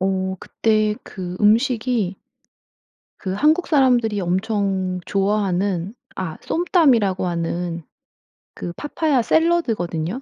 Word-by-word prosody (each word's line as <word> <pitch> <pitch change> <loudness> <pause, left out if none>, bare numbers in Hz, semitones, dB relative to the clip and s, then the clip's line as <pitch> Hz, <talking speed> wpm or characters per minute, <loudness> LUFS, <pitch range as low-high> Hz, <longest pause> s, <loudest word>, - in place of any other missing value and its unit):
어 190 0 -1
그때 215 -1 +1
그 180 -2 -7
음식이 220 -2 +2 1.0
그 190 - -4
한국 310 - +3
사람들이 245 -8 +3
엄청 190 0 -1
좋아하는 195 -1 0 0.2
아 175 -4 -4
쏨땀이라고 260 - +2
하는 170 0 -2 0.7
그 175 - -6
파파야 295 - 0
샐러드거든요. 230 - 0
205 Hz, 225 characters per minute, -21 LUFS, 185-245 Hz, 1.0 s, 한국